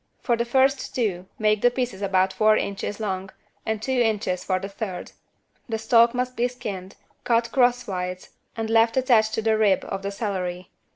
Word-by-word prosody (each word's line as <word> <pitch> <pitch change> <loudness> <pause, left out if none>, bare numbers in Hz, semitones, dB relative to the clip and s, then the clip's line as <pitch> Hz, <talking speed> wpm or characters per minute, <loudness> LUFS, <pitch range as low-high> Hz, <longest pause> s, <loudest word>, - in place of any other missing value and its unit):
For 240 - +1
the 235 +1 -1
first 265 +2 +1
two 190 -7 -1
make 215 -1 +2
the 245 - +5
pieces 245 -5 -3
about 190 -1 +2
four 215 0 +4
inches 200 +1 -3
long, 190 -3 -3 0.4
and 220 -1 -1
two 240 +5 -4
inches 205 -5 0
for 185 - 0
the 190 +1 -5
third. 195 -2 -6 0.6
The 225 - -1
stalk 235 +2 +4
must 250 0 -2
be 240 0 +1
skinned, 200 -6 -7 0.3
cut 230 -1 +1
crosswise 200 -8 0 0.3
and 225 -1 -2
left 225 +2 +3
attached 225 -4 +3
to 220 - -2
the 220 -1 +2
rib 205 -3 +3
of 195 - -4
the 200 - -3
celery. 185 -4 -4
215 Hz, 180 wpm, -24 LUFS, 195-235 Hz, 0.6 s, the